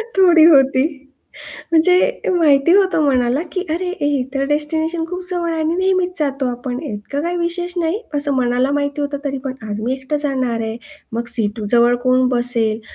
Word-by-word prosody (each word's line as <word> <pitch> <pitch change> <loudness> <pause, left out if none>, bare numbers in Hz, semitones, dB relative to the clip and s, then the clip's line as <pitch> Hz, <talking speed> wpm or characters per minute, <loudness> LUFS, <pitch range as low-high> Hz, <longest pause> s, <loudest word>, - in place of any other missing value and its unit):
थोडी 350 -4 +5
होती 270 -5 +4 0.9
म्हणजे 360 +9 +2
माहिती 320 -3 +3
होतं 380 -5 +2
मनाला 255 -1 +1
की 370 -1 -3
"अरे 360 +2 -3
हे 290 -2 0
तर 275 0 -1
डेस्टिनेशन 315 +3 -1
खूप 360 +1 -6
जवळ 345 -2 -2
आहे 325 - -3
आणि 315 +2 -1
नेहमीच 370 -1 +1
जातो 275 -3 -1
आपण 245 +1 -5
इतकं 275 +1 -6
काही 345 +2 -3
विशेष 350 +1 -2
नाही." 340 +5 -1
असं 285 -1 +2
मनाला 250 +1 0
माहिती 285 0 -2
होतं 285 0 -3
तरी 275 -1 -3
पण, 265 -1 -4 0.2
"आज 205 +1 -4
मी 245 +3 -2
एकटं 265 +3 -4
जाणार 255 -5 -2
आहे. 220 0 -4 0.4
मग 235 +1 -3
सीटजवळ 230 +2 +2
कोण 255 0 +2
बसेल? 240 -3 +3
285 Hz, 170 wpm, -17 LUFS, 250-335 Hz, 0.9 s, थोडी